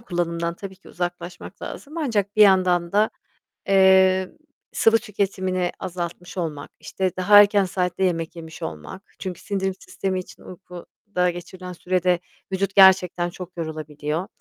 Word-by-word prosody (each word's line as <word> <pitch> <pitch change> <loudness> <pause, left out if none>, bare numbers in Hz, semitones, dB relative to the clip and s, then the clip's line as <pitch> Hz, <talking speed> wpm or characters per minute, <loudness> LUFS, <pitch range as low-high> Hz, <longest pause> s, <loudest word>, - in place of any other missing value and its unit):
kullanımından 170 -4 -2
tabii 190 +1 -9
ki 190 - -18
uzaklaşmak 175 0 -6
lazım. 305 +4 -7
Ancak 215 - -1
bir 215 - +7
yandan 185 -3 +4
da, 210 +2 +3 0.6
eee, 190 -1 +5 0.4
sıvı 225 0 +4
tüketimini 190 -4 -2
azaltmış 175 -1 -6
olmak, 155 -5 -4
işte, 185 -2 -2
daha 205 +3 +7
erken 205 -1 +4
saatte 180 0 -1
yemek 165 -2 -1
yemiş 160 -1 -10
olmak 80 - -7 0.2
çünkü 185 -3 -6
sindirim 190 -2 -2
sistemi 190 -1 -3
için - - -13
uykuda 180 0 -4
geçirilen 180 +1 -8
sürede 180 0 0 0.3
vücut 195 +1 -1
gerçekten 185 -2 +5
çok 180 0 -10
yorulabiliyor. 155 +1 -4
185 Hz, 135 wpm, -23 LUFS, 175-195 Hz, 0.6 s, bir